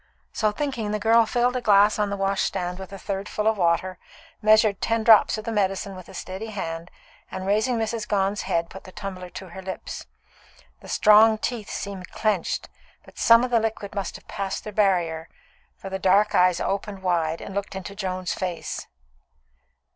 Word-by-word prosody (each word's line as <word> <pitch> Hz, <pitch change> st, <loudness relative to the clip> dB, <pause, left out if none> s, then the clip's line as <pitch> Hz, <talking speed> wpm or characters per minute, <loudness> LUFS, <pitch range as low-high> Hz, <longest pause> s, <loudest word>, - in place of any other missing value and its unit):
So 215 Hz, -2 st, +1 dB
thinking, 235 Hz, -3 st, -3 dB
the 210 Hz, -, 0 dB
girl 225 Hz, +1 st, +4 dB
filled 245 Hz, +2 st, +1 dB
a 250 Hz, -, -1 dB
glass 205 Hz, -1 st, +4 dB
on 210 Hz, -1 st, +1 dB
the 200 Hz, -, -3 dB
wash 195 Hz, 0 st, +1 dB
handstand 180 Hz, -1 st, -3 dB
a 190 Hz, +1 st, -8 dB
third 195 Hz, +1 st, -4 dB
full 210 Hz, -, -2 dB
of 220 Hz, -2 st, +2 dB
water, 175 Hz, +1 st, +1 dB, 0.4 s
measured 215 Hz, -2 st, +4 dB
ten 230 Hz, -1 st, 0 dB
drops 220 Hz, 0 st, +6 dB
of 215 Hz, -, -7 dB
the 230 Hz, -, -2 dB
medicine 195 Hz, -2 st, -1 dB
with 185 Hz, 0 st, -11 dB
a 190 Hz, -, -11 dB
steady 190 Hz, +5 st, -6 dB
hand, 170 Hz, -5 st, -5 dB, 0.4 s
and 190 Hz, 0 st, -6 dB
raising 215 Hz, +5 st, +1 dB
Mrs. 220 Hz, -1 st, -2 dB
Gone's 200 Hz, 0 st, 0 dB
head, 170 Hz, 0 st, -1 dB
put 190 Hz, -, -10 dB
the 185 Hz, -, -11 dB
tumbler 185 Hz, -2 st, -7 dB
to 190 Hz, +1 st, -9 dB
her 190 Hz, +2 st, -9 dB
lips. 190 Hz, 0 st, -7 dB, 0.7 s
The -, -, -14 dB
strong 220 Hz, +1 st, +6 dB
teeth 220 Hz, -1 st, -4 dB
seemed 195 Hz, -2 st, -6 dB
clenched, 210 Hz, -5 st, -1 dB, 0.4 s
but -, -, -14 dB
some 230 Hz, +1 st, +6 dB
of 250 Hz, -, -2 dB
the 235 Hz, -, +4 dB
liquid 220 Hz, -2 st, -3 dB
must 200 Hz, -3 st, -4 dB
have -, -, -12 dB
passed 195 Hz, -1 st, -4 dB
their 215 Hz, -, -7 dB
barrier, 175 Hz, -6 st, +1 dB, 0.5 s
for 195 Hz, -, -8 dB
the 190 Hz, -, -3 dB
dark 200 Hz, +3 st, +3 dB
eyes 180 Hz, -1 st, +4 dB
opened 195 Hz, 0 st, -3 dB
wide 165 Hz, -3 st, 0 dB
and 195 Hz, -, -8 dB
looked 200 Hz, +1 st, -3 dB
up -, -, -2 dB
into 190 Hz, +1 st, -7 dB
Joan's 185 Hz, -2 st, -3 dB
face. 180 Hz, -3 st, -4 dB
200 Hz, 190 wpm, -24 LUFS, 185-215 Hz, 0.7 s, drops